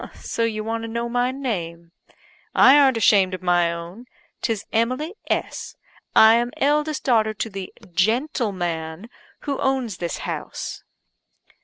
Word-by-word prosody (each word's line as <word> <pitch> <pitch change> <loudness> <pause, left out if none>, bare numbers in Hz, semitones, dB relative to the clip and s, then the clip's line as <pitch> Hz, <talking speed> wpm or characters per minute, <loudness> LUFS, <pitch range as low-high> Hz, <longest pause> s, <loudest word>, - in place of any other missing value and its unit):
So - - -5
you 215 -2 -1
want 225 +1 -3
to - - -4
know 235 +1 -3
my 245 +1 +1
name. 170 -11 -4 0.6
I 265 - +8
arn't 270 -4 +5
ashamed 195 -4 +4
of 185 - -11
my 175 -1 +3
own; 170 +8 -8 0.4
'tis 225 -4 -2
Emily 255 - 0 0.2
S. - - -3 0.4
I 220 0 +8
am 240 +1 +2
eldest 295 +1 +1
daughter 220 -4 +2
to 225 - -3
the 195 -1 -6 0.2
gentleman 190 - -1 0.3
who 280 -2 -3
owns 260 -7 -1
this 170 -1 -3
house." - - -5
225 Hz, 140 wpm, -23 LUFS, 185-250 Hz, 0.6 s, I